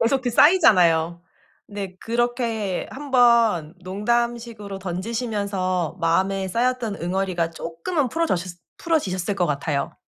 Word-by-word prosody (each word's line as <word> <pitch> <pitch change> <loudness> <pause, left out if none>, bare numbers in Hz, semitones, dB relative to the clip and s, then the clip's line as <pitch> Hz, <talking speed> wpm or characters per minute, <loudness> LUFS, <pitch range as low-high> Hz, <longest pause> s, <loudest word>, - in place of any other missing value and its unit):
계속 260 +3 +2
그 245 - -1
쌓이잖아요. 175 - +4 0.5
근데 200 -3 -6
그렇게 230 -4 -1
한번 235 - +3
농담식으로 225 +1 -2
던지시면서 190 -2 -2
마음에 190 +3 +1
쌓였던 235 0 -1
응어리가 180 -2 -1
조금은 170 - -3
풀어져싰 190 - -1 0.3
풀어지셨을 205 - -1
것 180 -2 +1
같아요. 145 -1 -2
200 Hz, 305 characters per minute, -23 LUFS, 180-240 Hz, 0.5 s, 쌓이잖아요